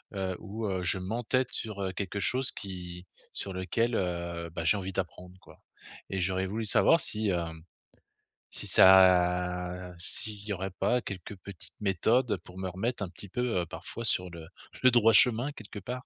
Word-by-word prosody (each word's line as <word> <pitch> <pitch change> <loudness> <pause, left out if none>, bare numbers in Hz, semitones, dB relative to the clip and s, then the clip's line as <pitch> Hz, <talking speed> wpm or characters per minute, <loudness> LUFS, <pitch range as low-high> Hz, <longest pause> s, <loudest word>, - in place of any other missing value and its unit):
heu, 95 -1 -2
où, 110 +1 -6
heu, 95 -2 -2
je 90 +2 +1
m'entête 120 +6 -1
sur, 105 -3 -5
heu, 95 - -2
quelque 100 +1 -4
chose 130 0 +1
qui 90 -2 -8 0.3
sur 95 - -5
lequel, 115 +6 -1
heu, 85 -2 -3
bah 80 - -3
j'ai 105 - +4
envie 95 -1 -5
d'apprendre, 90 -1 -5
quoi. - - -18 0.5
Et 95 -1 -2
j'aurais 95 +1 -1
voulu 110 +3 -3
savoir 165 +10 +4
si 105 -4 -1
hem, 80 -3 -3 0.9
si - - -4
ça 90 -1 +4
s'il 105 +4 -2
y 105 - -1
aurait 95 0 -4
pas 125 +6 0
quelques 95 0 -7
petites 95 -1 -10
méthodes, 105 +4 +2
pour 90 +1 -13
me 95 -1 -3
remettre 105 +4 -2
un 90 - -4
petit 95 +2 -10
peu, 125 -4 -1
heu, - - -3
parfois, 115 +6 -7
sur 90 -3 +5
le 80 -2 -10 0.4
le 130 - +8
droit 115 -2 +5
chemin 125 +5 +5
quelque 105 -4 -9
part. 125 +5 -6
95 Hz, 180 wpm, -29 LUFS, 90-110 Hz, 0.9 s, le